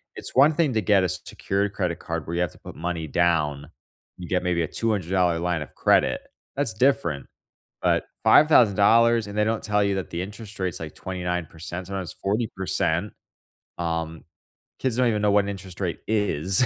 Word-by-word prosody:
It's - - -7
one 145 +4 +6
thing 150 -6 +2
to 110 - +1
get 100 -3 +3
a 90 - +1
secured 100 +4 -2
credit 90 -4 -2
card 85 -1 -4
where 85 - -4
you 85 - 0
have 90 - 0
to - - -18
put - - -10
money 85 0 -3
down, 75 -3 +1 0.5
you 90 - -8
get 90 0 +1
maybe 90 -2 0
a 80 - -2
$200 90 -5 0
line 85 -1 -1
of 75 - -9
credit, - - +3 0.3
that's 135 -5 -1
different, 105 - +1 0.5
but - - +2 0.2
$5000 125 -10 +6
and 115 0 +4
they 105 - +4
don't 110 0 -1
tell 105 -1 +1
you 100 -1 +1
that 95 -1 -4
the 85 - -3
interest 105 +2 -8
rates 90 -2 -2
like 80 -2 -7
29%, 90 -1 -5
sometimes 95 -2 -5
40%, 100 -3 -1 0.6
um, 80 -1 -3 0.6
kids 130 -3 -1
don't 125 -1 +3
even 105 -2 +1
know 105 -1 +3
what 100 0 +4
an - - -3
interest 95 -2 -8
rate 90 -3 -2
is. 105 - +1
95 Hz, 185 wpm, -25 LUFS, 85-105 Hz, 0.6 s, one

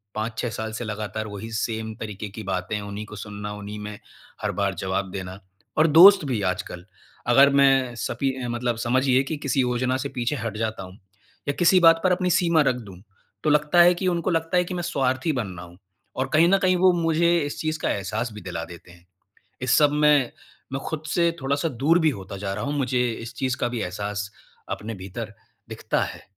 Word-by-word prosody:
5-6 110 +2 -2
साल 110 0 -5
से 110 - -4
लगातार 110 0 -4
वही 105 +2 -7
सेम 110 0 -3
तरीके 105 -1 -6
की 110 +2 -8
बातें 95 +2 -2
उन्हीं 100 +1 -6
को 105 - -10
सुनना, 105 0 -6
उन्हीं 105 0 -7
में, 105 0 -7 0.4
हर - - -1
बार 100 -1 -1
जवाब 95 0 -2
देना। 95 0 -6 0.4
और 155 +1 +5
दोस्त 185 +5 +8
भी 125 -6 -1
आजकल 90 -2 -3 0.4
अगर 135 +4 +6
मैं 135 -3 +3
सपी 135 +4 -1
अ, - - -3
मतलब 120 0 -1
समझिए 130 +2 +2
कि 150 +2 -4
किसी 140 -2 0
योजना 125 +1 0
से 140 +1 -4
पीछे 125 +1 -2
हट 115 -3 -4
जाता 110 -3 -3
हूँ 95 0 -11 0.5
या 140 - +2
किसी 180 +2 +5
बात 165 -1 +6
पर 185 - +3
अपनी 180 0 +1
सीमा 170 -1 +3
रख 135 -3 +2
दूँ, 100 -7 -10 0.4
तो - - +2
लगता 150 +3 +4
है 175 +1 +7
कि 185 +1 -3
उनको 175 0 0
लगता 165 +2 0
है 180 - +4
कि 185 - -6
मैं 175 -1 -3
स्वार्थी 135 -2 0
बन 120 -6 -2
रहा 85 - -8
हूँ। 85 +1 -16 0.4
और 130 +1 -1
कहीं 160 +2 +6
न 195 - +5
कहीं 185 -1 +3
वो 185 +1 +5
मुझे 170 +1 +3
इस 145 - -5
चीज़ 155 0 -2
का - - -1
एहसास 110 +5 -3
भी 105 - -9
दिला 90 -3 -5
देते 85 0 -13
हैं। 85 0 -19 0.6
इस 125 -1 +3
सब 145 -1 +4
में 150 -4 +3 0.4
मैं 135 - -2
खुद 155 -1 -4
से 170 -1 +2
थोड़ा-सा 140 +4 0
दूर 150 +5 +2
भी 160 -2 +3
होता 100 -5 -7
जा 100 0 -3
रहा - - -4
हूँ। 145 +1 -2
मुझे 125 -2 +1
इस 115 +1 -8
चीज़ 130 -1 -1
का - - +1
भी 120 -1 -4
एहसास 100 +2 -4 0.5
अपने 115 +2 -7
भीतर 100 +3 -7 0.3
दिखता - - -2
है। - - -8
125 Hz, 215 wpm, -24 LUFS, 105-150 Hz, 0.6 s, दोस्त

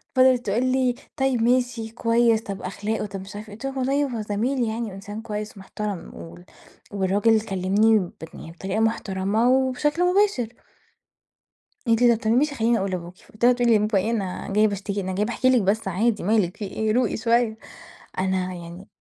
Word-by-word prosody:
فِضلت 255 -1 +4
تقول 220 +5 +1
لي: 255 -1 +1 0.2
"طيّب 265 -3 +1
ماشي 245 -1 +1
كويس، 230 0 +2
طب 200 -4 -6
أخلاقه، 210 +4 -3
طب 195 -2 -6
مش 195 +2 -10
عارفة 210 +1 -7
إيه" 205 - -9
قُلت 230 - -9
لها: 270 0 -4
"والله 275 +3 +1
هو - - -2
زميل 230 +6 -1
يعني، 225 -1 -3
وإنسان 205 +3 -8
كويس 210 -1 -6
ومحترم، 195 0 -6
وال 85 +1 -11 0.5
والراجل 205 +3 +2
كلّمني 205 +2 +2
ب 180 -3 -5 0.2
يعني 165 - -10
بطريقة 190 +5 -3
محترمة 220 0 +1
وبشكل 265 +6 +1
مباشر." 370 - +1 1.3
قالت 230 0 +3
لي: 240 -1 +6
"طب - - -12
تمام 225 +2 +2
ماشي 295 +1 +1
خلّيني 230 -2 +2
أقول 195 0 -2
لأبوكِ." 175 -1 -5 0.2
قُلت 215 +2 -3
لها: 245 - +7
"تقولي 240 -2 +3
لبابا 210 -1 +1
إيه 205 +4 0
أنا 195 -6 -3
جاية 215 +2 +4
باشتكي! 200 0 -3
أنا 190 -1 -3
جاية 205 +3 0
باحكي 255 +2 +1
لِك 250 -4 +4
بس 200 +2 0
عادي، 210 +5 0
مالِك 205 -2 +1
في 210 - -5
إيه 215 +2 -1
روقي 250 +3 +1
شوية!" 230 -1 +1 0.6
أنا 185 -1 -1
يعني 175 +2 -10
220 Hz, 185 wpm, -24 LUFS, 195-240 Hz, 1.3 s, لها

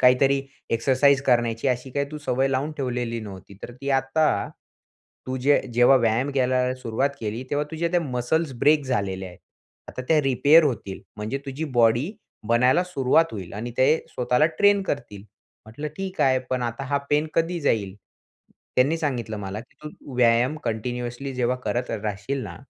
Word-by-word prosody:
काहीतरी 135 +2 +4 0.3
एक्सरसाइज 135 +4 +3
करण्याची 120 -1 +1
अशी 125 +1 -2
काही 140 +2 -1
तू 155 - -6
सवय 135 -2 0
लावून 135 +3 -1
ठेवलेली 120 -3 -2
नव्हती. 100 -2 -10
तर - - -7
ती 140 0 -3
आता 135 +4 +1 0.8
तू 130 0 -2
जे 140 +3 +3
जेव्हा 120 +3 +6
व्यायाम 120 +3 +1
करायला 130 -1 +1
सुरुवात 130 +2 -1
केली 110 +2 -3
तेव्हा 145 +1 0
तुझ्या 165 +1 -1
त्या 175 - +2
मसल्स 140 +2 -1
ब्रेक 150 +2 +4
झालेल्या 95 -7 -2
आहेत. 90 - -14 0.5
आता 130 - -6
त्या 160 -2 +5
रिपेअर 140 +5 +5
होतील. 110 -8 -3 0.2
म्हणजे 110 +6 -3
तुझी 135 +4 -4
बॉडी 120 - +3 0.4
बनायला 125 +8 +4
सुरुवात 160 -2 +3
होईल 95 -5 -7
आणि 115 +4 -5
ते 130 - +5 0.2
स्वतःला 125 +4 +2
ट्रेन 205 -1 +5
करतील." 140 - -4
म्हंटलं 110 +5 -11
"ठीक 195 0 -5
आहे. 130 -1 +4
पण 130 -1 0
आता 120 +3 -3
हा 140 +1 0
पेन 150 +1 +2
कधी 165 +1 0
जाईल?" 105 -9 0 0.8
त्यांनी 140 +6 +3
सांगितलं 125 -8 -2
मला 100 +1 -5
की 120 - -18
"तू 145 -3 -10
व्यायाम 120 +4 +3
कंटिन्युअसली 120 +3 -4
जेव्हा 125 0 0
करत 120 +1 -2
राहशील 110 +5 -3
ना - - -7
130 Hz, 165 wpm, -24 LUFS, 115-140 Hz, 0.8 s, जेव्हा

